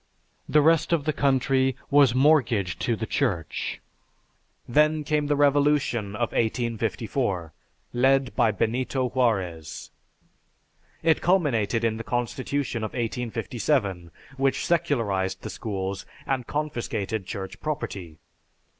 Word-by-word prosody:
The 150 -1 +5
rest 165 +1 +3
of 165 -4 +2
the 155 - +1
country 135 -1 +2 0.2
was 140 -4 +5
mortgaged 125 - +3
to 120 - +1
the 110 - -4
Church. 100 - -2 0.9
Then 150 +4 +3
came 150 0 0
the 145 - +2
revolution 140 -7 +2
of 120 +1 -1
1854, 110 - -1 0.4
led 130 -2 +2
by 115 - +4
Benito 125 +5 0
Juarez. 95 - -1 1.1
It 160 -1 +3
culminated 125 - +2
in 110 -1 +1
the 115 - -5
Constitution 125 0 -2
of 110 - -4
1857, 115 - -1 0.3
which 135 0 +1
secularized 115 - 0
the - - -5
schools 100 -2 -4 0.2
and 130 -3 -1
confiscated 115 -9 -3
Church 95 -1 -6
property. 100 - -4
120 Hz, 110 wpm, -26 LUFS, 105-140 Hz, 1.1 s, The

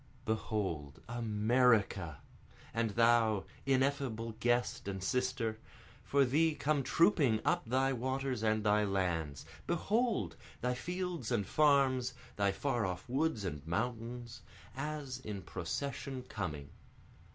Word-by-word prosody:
Behold, 95 - -2
America! 110 - +2 0.5
(and 115 0 +1
thou, 115 -2 +4 0.2
ineffable 130 -4 +1
guest 120 -3 +1
and 95 -1 -3
sister!) 125 -2 0 0.4
For 140 -1 +3
thee 155 +5 +3
come 145 -1 +1
trooping 145 - +3
up - - +3
thy 135 +2 +2
waters 130 0 -2
and 110 -1 +2
thy 105 0 +4
lands; 90 -8 -1 0.2
Behold! 195 - 0 0.2
thy 125 +1 0
fields 175 -2 -3
and 110 -5 +1
farms, 135 -1 +3 0.2
thy 100 -1 +2
far 120 +3 -1
off 90 +1 -3
woods 130 -4 0
and 75 -6 -3
mountains, 115 +4 -3 0.3
As 140 -2 -4
in 105 -7 -6
procession 135 +9 -4
coming. 80 - -5
120 Hz, 115 wpm, -34 LUFS, 105-135 Hz, 0.5 s, thou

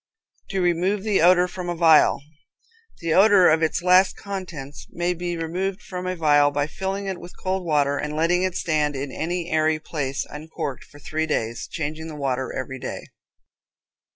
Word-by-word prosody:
To 195 -2 -1
Remove 180 +3 +1
the 210 -5 +2
Odor 180 +1 +5
from 180 0 -6
a 175 - -2
Vial. 160 -4 +5 0.8
The 165 -1 0
odor 195 -1 +6
of 160 +1 +4
its 160 +2 0
last 185 +1 +5
contents 170 -8 -7
may 175 +1 -1
be 175 0 -4
removed 185 +4 -3
from 180 -1 -6
a 185 - -2
vial 145 -3 +4
by 145 0 -1
filling 195 +5 -4
it 190 -2 -4
with 175 - -12
cold 185 0 -2
water, 145 -3 +1
and 150 0 -3
letting 170 +3 +2
it 185 -1 -1
stand 150 -4 0
in 135 0 -4
any 175 +4 -3
airy 155 0 +2
place 140 -4 -3
uncorked 150 -3 -6
for 145 - -17
three 155 +2 -3
days, 115 -6 -2
changing 155 +1 -5
the 155 - -7
water 130 -2 -2
every 130 0 -5
day. - - -6
165 Hz, 180 wpm, -23 LUFS, 150-180 Hz, 0.8 s, odor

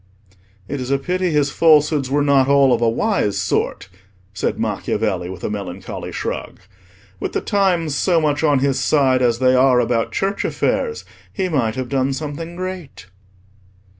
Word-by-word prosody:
"It 140 -1 -4
is 125 - -5
a 140 - +2
pity 180 +6 -1
his 145 -3 +1
falsehoods 150 -4 +3
were 145 +1 +1
not 140 -2 +3
all 140 -2 +4
of 120 - 0
a 115 - +3
wise 115 - 0
sort," - - -1 0.5
said - - -2
Macchiavelli, 100 -5 -2
with 95 -1 -9
a - - -2
melancholy 95 -3 -6
shrug. - - -5 0.6
"With - - -4
the - - 0
times 180 -6 +1
so 170 +3 +2
much 150 -1 0
on 145 -3 +3
his 135 -1 0
side 135 -2 +2
as 120 -2 +2
they 130 +1 +3
are 130 -1 +4
about 115 -1 0
Church 195 +1 -1
affairs, 455 -1 -1 0.3
he 190 -3 -2
might 120 -8 0
have 130 -1 -3
done 135 +1 0
something 155 +4 -6
great." 185 - -7
140 Hz, 165 wpm, -19 LUFS, 125-160 Hz, 0.6 s, all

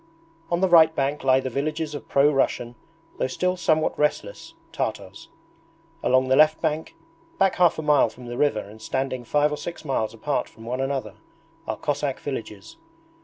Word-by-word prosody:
On 175 +1 0
the 190 - +4
right 160 -2 +6
bank 140 +1 -1
lie 130 -1 +4
the 130 -1 -4
villages 155 +3 -2
of 145 - -7
pro 140 +2 +4
Russian, 120 -3 0 0.5
though - - +1
still 180 +7 -1
somewhat 155 -3 +1
restless, 150 - -2 0.2
Tartars. - - -5 0.7
Along 130 0 +3
the 130 - +3
left 155 +2 +5
bank, 160 -1 -2 0.4
back 195 - +2
half 175 -2 +4
a 155 - -4
mile 150 -5 +4
from 125 +2 -13
the 120 0 -6
river 120 -5 +1
and 105 +2 -13
standing 130 +1 -3
five 150 +4 +1
or 150 - -3
six 170 0 -7
miles 115 -6 -1
apart 125 +3 -2
from 115 - -15
one 125 +3 -3
another, 135 -6 -3 0.5
are - - -2
Cossack 145 -2 -2
villages. 115 - -7
140 Hz, 175 wpm, -24 LUFS, 130-155 Hz, 0.7 s, right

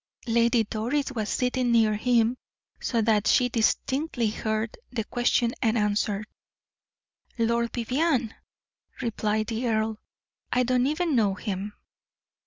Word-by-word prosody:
Lady 235 0 +3
Doris 240 +7 -2
was 220 -5 -3
sitting 250 -1 0
near 225 -2 +4
him, 235 +2 +2 0.4
so 230 -2 0
that 215 -2 +2
she 250 -1 +4
distinctly 245 +1 0
heard 220 0 -2 0.2
the 235 -3 -2
question 240 +1 +1
and 230 -2 +2
answer. 210 -1 0 1.1
"Lord 235 0 +1
Vivianne!" 255 0 0 0.7
replied 215 -1 -1
the 230 +3 -2
earl. 220 -1 0 0.5
"I 250 - +3
do 250 +1 +1
not 255 +3 +2
even 315 -1 0
know 205 -5 +2
him." 205 0 -4
230 Hz, 125 wpm, -26 LUFS, 215-250 Hz, 1.1 s, near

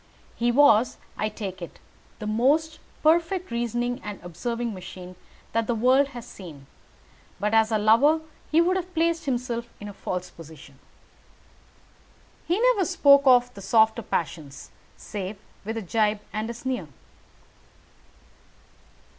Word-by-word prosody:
He 240 +1 +1
was, 240 -3 +4 0.2
I 215 - -1
take 195 -3 -7
it, 170 - -8 0.4
the 210 - -7
most 280 +9 +1 0.2
perfect 335 +3 +2
reasoning 240 +2 -2
and 210 -1 -6
observing 230 +7 -4
machine 185 -1 -10 0.4
that 230 -1 0
the 240 - 0
world 255 +5 +4
has 245 -4 -9
seen; 165 - -11 0.7
but 210 +1 -1
as 220 0 +4
a 220 - +3
lover, 230 +10 +4 0.3
he 320 +2 +5
would 365 +2 +2
have 365 0 -6
placed 330 0 +1
himself 240 -3 -2
in 205 - -8
a 205 - -8
false 180 -2 -5
position. 155 -4 -14 1.7
He 350 +5 +1
never - - +3
spoke 280 -2 +5
of 245 -1 +5
the 200 - -11
softer 220 +3 +3
passions, 155 -7 -4 0.3
save 200 0 -6 0.3
with 220 +2 -4
a 225 - -4
gibe 210 +2 0
and 215 +2 -3
a 235 - -5
sneer. 245 -7 -4
230 Hz, 140 wpm, -25 LUFS, 205-275 Hz, 1.7 s, he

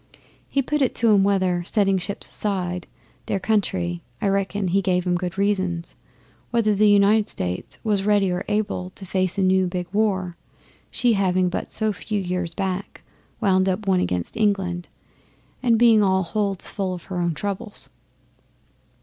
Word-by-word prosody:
He 275 - +1
put 300 +3 -1
it 260 - +1
to 225 -2 +4
'em 195 -1 +5
whether, 185 -3 +1
setting 195 +1 +2
ships 200 +3 -4
aside, 180 -3 -3 0.4
their 195 - 0
country 90 - 0 0.2
I 200 - +1
reckon 195 0 0
he 195 +3 +2
gave 180 -1 +1
'em 180 - +1
good 180 0 -3
reasons 190 -4 0 0.6
whether 225 -3 +2
the 210 +1 +4
United 205 +1 +4
States 90 0 -4
was 210 -3 +1
ready 205 -2 +3
or 180 +2 -2
able 205 -3 -1
to 195 - -7
face 185 0 -1
a 195 - +2
new 185 0 +3
big 180 0 -3
war; 190 -5 0 0.5
she 245 -2 +2
having 185 -2 +2
but - - -4
so 215 -1 0
few 210 +2 -3
years 180 -2 -3
back 190 +1 -4 0.4
wound 190 -3 +3
up 190 +3 -2
one 190 -1 +3
against 90 - -2
England, 195 -5 0 0.7
and 235 -3 +3
being 230 -2 +6
all 190 -1 +3
holds 200 +1 -1
full 190 -3 -2
of 175 - -10
her 185 - -6
own 170 -2 0
troubles. 205 +4 -5
195 Hz, 165 wpm, -23 LUFS, 180-210 Hz, 0.7 s, being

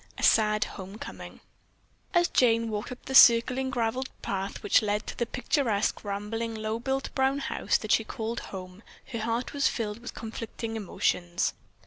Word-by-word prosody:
A - - -6
SAD 215 -1 +4
HOMECOMING 195 +2 -9 0.7
As 345 0 +5
Jane 230 -2 +3
walked 210 +3 -4
up 250 - -9
the 265 - -5
circling 255 +1 +7
graveled 250 0 -1
path 195 0 -3
which 205 - +5
led 210 0 -1
to - - -6
the 240 - -1
picturesque, 230 -5 0
rambling, 215 +3 -3
low 220 +1 -2
built 270 +2 -2
brown 265 +1 +2
house 280 - 0
that - - -4
she - - +4
called 230 0 -4
home 185 0 -8 0.3
her 230 - -3
heart 230 +2 -2
was 285 0 +2
filled 215 -2 -3
with 245 - -8
conflicting 225 0 -5
emotions. 180 -3 0
225 Hz, 160 wpm, -28 LUFS, 210-250 Hz, 0.7 s, circling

